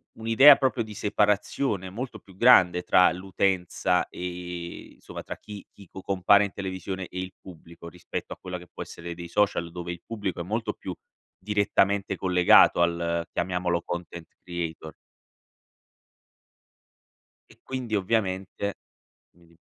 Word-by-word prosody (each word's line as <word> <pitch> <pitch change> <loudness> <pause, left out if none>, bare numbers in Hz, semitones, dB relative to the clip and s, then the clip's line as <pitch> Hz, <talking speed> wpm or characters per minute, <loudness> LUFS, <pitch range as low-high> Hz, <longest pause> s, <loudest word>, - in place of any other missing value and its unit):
un'idea 115 +6 +7
proprio 130 -3 0
di 110 -1 -10
separazione 105 0 0
molto 115 +3 -6
più 95 -1 -19
grande 90 -6 +5
tra 90 - +5
l'utenza, 90 0 0
ehm, 90 -1 -7
insomma - - -10
tra - - -7
chi 105 -1 -10
chi 100 - -16
co 95 - -10
compare 100 +2 +4
in 100 - -6
televisione 95 -1 -5
e 90 - -7
il 95 0 -5
pubblico, 85 -1 -13
rispetto 90 0 -6
a - - -14
quella 90 -1 -6
che 90 - -14
può - - -6
essere 85 0 -8
dei 85 0 -8
social 85 -3 0
dove 85 0 -6
il 85 0 -8
pubblico 105 -6 -4
è - - -2
molto 110 +3 -2
più, 95 - -7 0.5
direttamente 100 0 +1
collegato 90 -2 +5
al 85 0 0
chiamiamolo 90 -1 -1
content 85 -1 -6 0.2
creator. 85 -3 -5 2.6
E - - -20
quindi 125 -4 -4
ovviamente, 100 -1 -1 0.6
come 85 0 -24
dire 85 0 -25
95 Hz, 140 wpm, -26 LUFS, 85-105 Hz, 2.6 s, un'idea